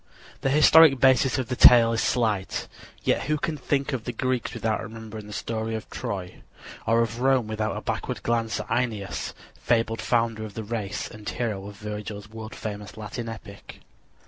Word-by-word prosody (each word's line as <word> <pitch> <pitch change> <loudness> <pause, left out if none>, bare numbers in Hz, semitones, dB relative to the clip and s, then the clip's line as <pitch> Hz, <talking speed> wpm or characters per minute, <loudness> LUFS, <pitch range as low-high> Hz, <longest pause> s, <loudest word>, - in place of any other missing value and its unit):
The 135 - +1
historic 150 0 +7
basis 130 0 +4
of 130 -3 -2
the 125 - -1
tales 115 -2 +7
is - - +1
slight; 110 -6 0 0.4
yet - - +1
who 150 +2 +1
can 155 +2 -2
think 140 -1 -1
of 125 -4 -2
the - - -2
Greeks 130 +1 -1
without 110 -1 -1
remembering 110 -1 -8
the - - -10
story 110 +1 -3
of 110 - -6
Troy, 95 -2 -5 0.5
or 115 +1 +4
of 115 +1 -4
Rome 130 -2 +3
without 110 -1 -2
a - - -4
backward - - -3
glance 115 -1 0
at - - -5
Æneas, 110 -6 -2 0.3
fabled 115 -1 +1
founder 115 -2 +1
of 105 -2 -8
the 110 - -4
race 105 -2 -3
and 105 -2 -8
hero 105 -5 -3
of 100 - -9
Virgil's 105 0 -6
world 110 0 -8
famous 105 -2 -6
Latin 115 +2 -5
epic? 100 -2 -10
115 Hz, 180 wpm, -26 LUFS, 105-120 Hz, 0.5 s, historic